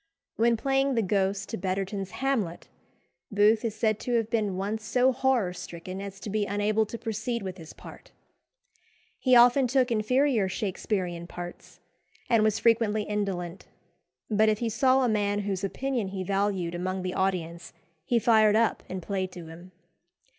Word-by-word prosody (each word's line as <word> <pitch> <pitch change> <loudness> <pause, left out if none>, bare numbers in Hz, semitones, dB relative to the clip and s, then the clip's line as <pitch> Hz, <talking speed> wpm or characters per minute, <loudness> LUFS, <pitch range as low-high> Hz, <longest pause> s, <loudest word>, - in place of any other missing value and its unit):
When 230 +1 +3
playing 270 +2 +1
the 230 - +2
Ghost 195 0 0
to 225 - -4
Betterton's 195 +1 -3
Hamlet, 240 -11 -2 0.6
Booth 210 +2 +4
is 225 -2 -2
said 215 -1 +1
to 245 - -3
have 225 -1 0
been 210 -5 0
once 210 +3 -3
so 250 +4 +3
horror 255 -7 +1
stricken 180 +2 -7
as 200 0 -8
to 210 - -5
be 210 -1 0
unable 205 +2 +1
to 230 - -6
proceed 225 0 -3
with 185 -1 -5
his 160 -1 -10
part. - - -13 1.1
He 255 -2 +4
often 245 +2 +6
took 255 0 +2
inferior 230 -1 +2
Shaksperean 185 -3 -3
parts, 175 0 -9 0.5
and 230 -2 +5
was 215 -1 +2
frequently 220 -2 +2
indolent; 195 -4 -3 0.6
but 215 0 +3
if 215 - +1
he 230 +1 -2
saw 260 +4 +3
a - - +3
man 205 -2 0
whose 195 -1 -3
opinion 245 +2 -2
he 190 0 -4
valued 195 -2 -1
among 185 +1 -3
the 185 0 -3
audience 175 -3 -2 0.3
he 240 - +1
fired 220 -2 +4
up 225 0 +2
and 185 -1 -5
played 190 -1 -2
to 175 -2 -9
him. 175 +3 -12
210 Hz, 165 wpm, -27 LUFS, 190-230 Hz, 1.1 s, often